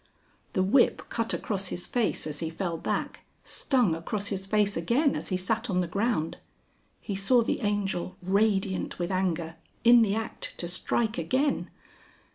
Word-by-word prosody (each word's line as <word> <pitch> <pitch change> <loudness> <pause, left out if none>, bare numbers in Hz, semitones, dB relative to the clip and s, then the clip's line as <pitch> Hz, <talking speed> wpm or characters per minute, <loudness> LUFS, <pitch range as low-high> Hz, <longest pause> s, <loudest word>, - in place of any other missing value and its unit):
The 185 - +2
whip 235 +7 +3
cut 230 -1 -1
across 195 -3 -1
his 175 0 -2
face 235 -9 0
as 150 -1 -4
he 165 - -2
fell 170 +1 -3
back, 165 - -3 0.2
stung 245 - +2
across 200 +5 -2
his 195 -1 -3
face 205 0 +2
again 245 - +2
as - - -4
he 185 - 0
sat 225 +6 -1
on 180 -2 +2
the 175 - -2
ground. 200 -3 -1 0.6
He 205 - -4
saw 230 +5 +4
the - - -1
Angel, 195 -3 -1
radiant 195 0 +1
with 175 +1 -2
anger, 170 -3 -1 0.3
in 240 +1 +8
the 210 -2 +2
act 225 +1 -4
to 175 - -3
strike 220 +6 0
again. 275 +3 0
195 Hz, 165 wpm, -28 LUFS, 180-225 Hz, 0.6 s, in